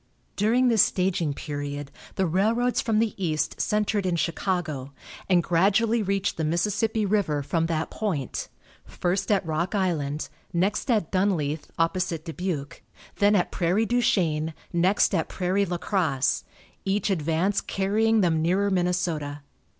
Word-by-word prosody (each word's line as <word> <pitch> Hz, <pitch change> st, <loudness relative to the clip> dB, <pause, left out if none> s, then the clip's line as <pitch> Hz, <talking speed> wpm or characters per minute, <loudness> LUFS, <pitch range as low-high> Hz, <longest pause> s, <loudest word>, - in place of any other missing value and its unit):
During 235 Hz, +5 st, +3 dB
this 225 Hz, -4 st, +5 dB
staging 175 Hz, -6 st, +1 dB
period 145 Hz, -1 st, -5 dB, 0.2 s
the 190 Hz, -, +1 dB
railroads 220 Hz, +8 st, +1 dB
from 225 Hz, -2 st, 0 dB
the 220 Hz, 0 st, +1 dB
East 155 Hz, -2 st, -1 dB
centered 210 Hz, -1 st, +1 dB
in 180 Hz, -2 st, 0 dB
Chicago, 165 Hz, -5 st, -2 dB, 0.4 s
and 175 Hz, -2 st, +4 dB
gradually 205 Hz, +7 st, +2 dB
reached 195 Hz, -1 st, -1 dB
the 160 Hz, -, -1 dB
Mississippi 210 Hz, +7 st, 0 dB
river 190 Hz, -8 st, +1 dB
from 165 Hz, +3 st, 0 dB
that 160 Hz, -1 st, -2 dB
point; 170 Hz, -, -3 dB, 0.4 s
first 190 Hz, +3 st, -2 dB
at 195 Hz, -3 st, +2 dB
Rock 165 Hz, +5 st, -1 dB
Island, 155 Hz, -6 st, -1 dB, 0.2 s
next 195 Hz, +9 st, 0 dB
at 215 Hz, -9 st, +1 dB
Dunleith, 170 Hz, -6 st, 0 dB
opposite 165 Hz, -1 st, 0 dB
Dubuque, 165 Hz, -4 st, -4 dB, 0.4 s
then 205 Hz, +1 st, +4 dB
at 180 Hz, -, +1 dB
Prairie 185 Hz, +5 st, +1 dB
du 245 Hz, +2 st, +1 dB
Chien, 160 Hz, -7 st, +1 dB, 0.2 s
next 185 Hz, +5 st, +3 dB
at 165 Hz, -4 st, 0 dB
Prairie 190 Hz, +2 st, 0 dB
La 175 Hz, 0 st, -2 dB
Crosse, 160 Hz, -8 st, 0 dB, 0.4 s
each 200 Hz, +1 st, 0 dB
advance 170 Hz, +3 st, +1 dB
carrying 215 Hz, +3 st, +1 dB
them 165 Hz, -4 st, +2 dB
nearer 190 Hz, +5 st, +1 dB
Minnesota. 175 Hz, -5 st, -1 dB
180 Hz, 140 wpm, -26 LUFS, 160-205 Hz, 0.4 s, this